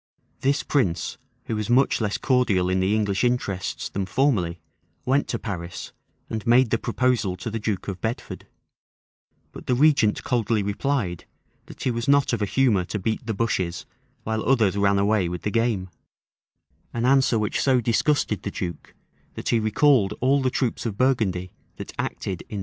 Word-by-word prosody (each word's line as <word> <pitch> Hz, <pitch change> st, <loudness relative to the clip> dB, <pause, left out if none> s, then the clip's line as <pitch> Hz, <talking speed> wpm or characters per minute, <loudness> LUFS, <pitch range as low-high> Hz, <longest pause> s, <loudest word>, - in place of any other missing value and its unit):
This 140 Hz, +2 st, +1 dB
prince, 90 Hz, -, 0 dB, 0.3 s
who 115 Hz, -, -2 dB
was 105 Hz, +1 st, -3 dB
much 125 Hz, 0 st, +3 dB
less 105 Hz, -2 st, 0 dB
cordial 105 Hz, -9 st, +2 dB
in 95 Hz, -, +1 dB
the 95 Hz, +3 st, +2 dB
English 100 Hz, -1 st, 0 dB
interests 120 Hz, -7 st, -1 dB
than 95 Hz, -1 st, -3 dB
formerly, 95 Hz, -9 st, +1 dB, 0.5 s
went 135 Hz, +3 st, +2 dB
to -, -, -2 dB
Paris, 90 Hz, -5 st, -6 dB, 0.3 s
and 110 Hz, -1 st, -4 dB
made 120 Hz, 0 st, +5 dB
the 115 Hz, -, +2 dB
proposal 120 Hz, -6 st, 0 dB
to 100 Hz, +5 st, -6 dB
the 115 Hz, -, -3 dB
duke 105 Hz, -3 st, -3 dB
of 95 Hz, -3 st, -5 dB
Bedford; 110 Hz, +2 st, -4 dB, 1.0 s
but -, -, -11 dB
the 125 Hz, -, +2 dB
regent 135 Hz, -6 st, +3 dB
coldly 115 Hz, -4 st, 0 dB
replied, 100 Hz, -, -2 dB, 0.4 s
that -, -, -10 dB
he 130 Hz, -, +1 dB
was 115 Hz, 0 st, -3 dB
not 140 Hz, -2 st, +3 dB
of 115 Hz, -, -1 dB
a 105 Hz, -, +1 dB
humor 115 Hz, -6 st, +2 dB
to 105 Hz, -, -4 dB
beat 110 Hz, +3 st, -2 dB
the 110 Hz, -, -1 dB
bushes 95 Hz, -6 st, -1 dB, 0.4 s
while 110 Hz, 0 st, -2 dB
others 115 Hz, -7 st, +3 dB
ran 100 Hz, 0 st, +3 dB
away 100 Hz, -2 st, +2 dB
with 90 Hz, 0 st, -5 dB
the 105 Hz, -, -1 dB
game; 115 Hz, -5 st, 0 dB, 1.1 s
an 120 Hz, 0 st, 0 dB
answer 130 Hz, -2 st, +4 dB
which 105 Hz, -1 st, -1 dB
so 130 Hz, -2 st, +3 dB
disgusted 115 Hz, -, +1 dB
the -, -, -4 dB
duke, 90 Hz, -3 st, -6 dB, 0.4 s
that -, -, -4 dB
he 115 Hz, -, +3 dB
recalled 110 Hz, -2 st, +3 dB
all 135 Hz, +2 st, +3 dB
the 130 Hz, -, +1 dB
troops 130 Hz, -2 st, -1 dB
of 100 Hz, -3 st, -5 dB
Burgundy 100 Hz, -9 st, +1 dB, 0.2 s
that -, -, -8 dB
acted 95 Hz, -3 st, -3 dB
in -, -, -16 dB
the -, -, -7 dB
siege. -, -, -3 dB
110 Hz, 180 wpm, -24 LUFS, 100-125 Hz, 1.1 s, made